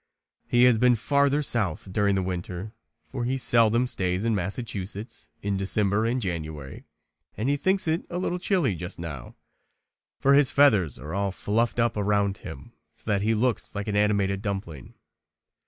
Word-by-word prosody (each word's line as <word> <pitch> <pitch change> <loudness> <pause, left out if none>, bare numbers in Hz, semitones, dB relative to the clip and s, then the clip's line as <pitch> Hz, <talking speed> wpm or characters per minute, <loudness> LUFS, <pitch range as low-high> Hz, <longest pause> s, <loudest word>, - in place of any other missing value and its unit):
He 120 0 +3
has 125 -3 +5
been 125 0 +5
farther 140 +5 +2
south 100 - 0
during 100 -1 +2
the 95 - 0
winter, 90 +3 -5 0.4
for 120 - -3
he 130 +3 -1
seldom 115 -1 +3
stays 95 -4 -1
in 115 - +2
Massachusetts 100 +1 -4 0.2
in 100 -1 -1
December 100 +2 +1
and 125 +2 0
January 80 - -5 0.5
and 110 +5 -2
he 145 - +2
thinks 190 +5 0
it 160 +1 -1
a 175 - -4
little 180 0 -2
chilly 175 - +1
just 90 +1 -5
now, 75 -8 -7 0.8
for 140 - +3
his 140 -2 +6
feathers 105 - +3
are 75 +6 -8
all 100 0 0
fluffed 115 +5 -1
up 115 -1 +2
around 100 -1 0
him 80 -7 -10 0.2
so - - -20
that 100 -2 0
he 110 +2 +1
looks 120 0 -1
like 100 +1 -4
an 105 - -2
animated 100 -2 +1
dumpling. 95 - -5
105 Hz, 170 wpm, -26 LUFS, 95-120 Hz, 0.8 s, his